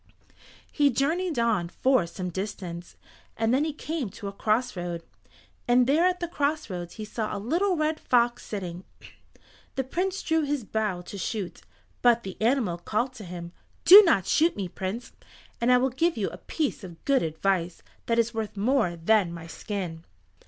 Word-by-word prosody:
He 290 -2 +3
journeyed 315 +6 0
on 225 -7 +1
for 255 -4 +2
some 180 +1 -5
distance 180 -2 -6 0.4
and 225 +1 +1
then 270 +3 +3
he 315 - -1
came 300 -4 -4
to 200 +2 -8
a - - -3
cross 220 +4 0
road, 175 -1 -4 0.6
and 245 +1 +5
there 310 +7 +4
at 360 0 0
the 345 - -2
cross 300 - -1
roads 175 -1 -6
he 215 - -6
saw 215 0 -3
a - - -3
little 345 - +1
red 310 0 0
fox 240 -1 +2
sitting. 180 -3 -5 0.9
The 265 - 0
Prince 365 +8 -2
drew 320 0 +2
his 290 -3 -1
bow 210 -4 -2
to 195 +3 -8
shoot, 190 +1 -4 0.4
but 235 -1 +4
the 190 -1 -6
animal 225 -7 +1
called 240 +8 -1
to 225 - -10
him, 175 -1 -7 0.3
"Do 395 +4 +12
not 275 - +3
shoot 325 - +3
me, 195 -3 -3
Prince, 190 +6 -5 0.5
and 240 +1 +3
I 250 - +7
will 260 +1 +1
give 330 +3 +1
you 205 - 0
a - - -9
piece 300 -8 -2
of 175 -3 -11
good 275 -2 +3
advice 170 +2 -1 0.2
that 230 - +1
is 235 0 +2
worth 220 -2 -4
more 220 -4 +2
than 180 +2 +2
my 170 -1 -8
skin." 170 -2 -5
225 Hz, 180 wpm, -27 LUFS, 185-275 Hz, 0.9 s, Do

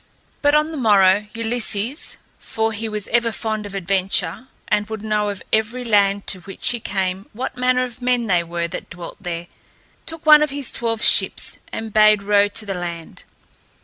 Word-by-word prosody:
But 290 0 +4
on 305 +1 +2
the 315 - -5
morrow, 205 -4 +4
Ulysses, 230 - -1 0.2
for 225 0 -2
he 220 +1 -4
was 210 -2 -4
ever 235 0 +2
fond 215 -2 -3
of 200 - -9
adventure 195 +3 -1 0.2
and 210 0 0
would 220 -1 -6
know 210 -1 0
of 200 -2 -6
every 225 +3 0
land 200 -2 +2
to 185 - -3
which 190 +2 -3
he 240 - -1
came 190 -2 -3
what 250 +5 -5
manner 250 0 +2
of 250 -1 -7
men 245 -1 +1
they 180 -5 +2
were 170 0 -3
that - - -7
dwelt 175 0 -8
there, 175 -2 -4 0.6
took 325 -1 -5
one 305 -1 +8
of 300 - +2
his 280 -2 -1
twelve 225 -2 -2
ships - - +3
and 225 -1 -6
bade 215 -1 +5
row 205 0 +4
to 215 +2 -1
the 195 - -3
land. 170 -2 -7
215 Hz, 185 wpm, -20 LUFS, 195-240 Hz, 0.6 s, one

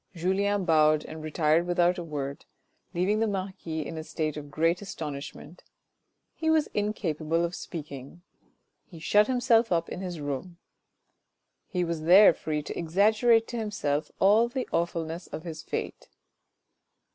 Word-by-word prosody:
Julien 190 +3 0
bowed 155 -2 +4
and 155 0 -8
retired 155 +2 +1
without 175 +1 +2
a - - -4
word, 140 -3 -5 0.5
leaving 195 +5 +1
the 225 - +2
marquis 185 -5 -4
in 160 - -6
a - - -5
state 155 -1 -3
of 145 -1 -7
great 165 +5 +1
astonishment. 150 -2 -7 0.7
He 320 - -2
was 315 -2 +4
incapable 170 -6 -1
of 170 - -5
speaking. 150 -1 -8 0.6
He 170 - -13
shut 205 +6 +3
himself 245 -3 +3
up 170 -1 +1
in 185 - -6
his 180 -3 -5
room. 145 +5 -5 1.1
He 180 -3 -1
was 170 -2 -3
there 180 +4 +7
free 150 -2 -3
to - - -6
exaggerate 215 +7 +3
to 240 - -4
himself 160 -9 -2
all 215 +5 +5
the 255 +1 -3
awfulness 170 0 -2
of 160 - -7
his 160 -3 -6
fate. - - -5
170 Hz, 145 wpm, -27 LUFS, 155-200 Hz, 1.1 s, there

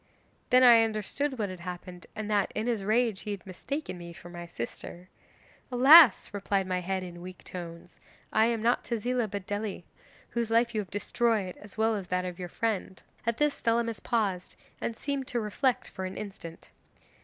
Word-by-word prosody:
'Then 255 -1 +6
I 235 -2 +9
understood 225 +6 -2
what 210 -3 -1
had 185 -1 -7
happened, 180 0 -8
and 215 -1 -4
that, 205 -2 +1
in 215 - -1
his 230 -5 -1
rage, 220 0 +2
he 215 - -7
had 200 -4 -5
mistaken 190 - -5
me 170 0 -9
for 175 - -12
my 175 0 -8
sister. 170 +6 -7 0.6
'"Alas," 265 - +8
replied 200 -1 0
my 185 -1 -1
head 190 +1 -2
in 175 -1 -9
weak 180 0 -10
tones, 170 -1 -9 0.3
"I 220 +1 +5
am 230 -2 -1
not 240 +1 +2
Tezila, 240 0 -1
but 200 -1 -5
Dely, 205 -2 -3 0.5
whose 235 -1 -2
life 230 +1 +3
you 215 - 0
have 195 - -10
destroyed, 205 -2 0
as 205 +1 -11
well 220 +1 +3
as 195 -3 -5
that 180 0 -1
of 180 0 -6
your 180 -1 -5
friend." 205 -2 -2 0.2
At 230 0 +1
this 295 -1 +1
Thelamis 230 -1 0
paused 200 -6 -1 0.3
and 230 - -3
seemed 275 -2 -3
to 240 - -1
reflect 250 +4 0
for 190 - -5
an 185 - -6
instant. 190 -5 -9
210 Hz, 190 wpm, -29 LUFS, 185-235 Hz, 0.6 s, I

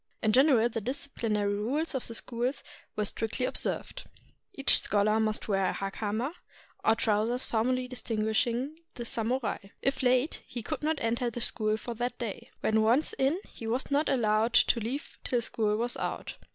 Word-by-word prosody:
In 215 - +4
general 255 -2 +5
the 225 -1 -3
disciplinary 225 -5 -1
rules 265 +12 -1
of 265 - -2
the 230 - -4
schools 245 +4 -2 0.3
were 210 - 0
strictly 225 +5 -1
observed. - - -2 0.5
Each 275 -9 +4
scholar 215 +1 +2
must 215 -1 0
wear 195 -2 +2
the - - 0
hakama, 215 +7 -2 0.5
or 220 - +4
trousers 225 +3 +2
formerly 250 +3 0
distinguishing 235 +4 -1 0.2
the 240 - -5
samurai. 235 -2 -1 0.2
If 270 +1 +1
late, 255 +4 +2
he 240 - -5
could - - -3
not 310 0 0
enter 235 +2 0
the 235 - -6
school 215 -2 +1
for 235 +2 -5
that 245 +2 -3
day. 225 -5 -5
When 220 0 +3
once 235 +8 +3
in, 280 +8 +2
he 225 - -8
was 250 +5 -1
not 290 +2 +2
allowed 225 -2 +2
to 235 - +5
leave 245 +6 -5
till 245 - +1
school 215 -2 0
was 240 +2 +1
out. - - -4
235 Hz, 170 wpm, -29 LUFS, 220-255 Hz, 0.5 s, general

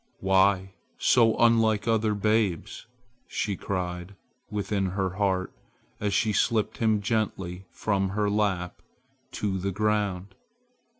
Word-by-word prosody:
"Why 95 0 +2 0.2
so 115 -3 +4
unlike 115 -2 +3
other 110 -2 +2
babes!" 105 -4 0 0.4
she 100 -2 -2
cried 90 0 -4 0.3
within 100 -1 -1
her 95 0 -1
heart 95 -1 -1 0.5
as 105 -1 -1
she 105 +2 +1
slipped 110 +1 +1
him 110 -2 +2
gently 95 -4 -2
from 95 -2 -1
her 105 +2 0
lap 100 -4 -1 0.5
to 95 -2 -2
the 100 +2 -2
ground. 105 -2 -1
100 Hz, 115 wpm, -27 LUFS, 95-105 Hz, 0.5 s, so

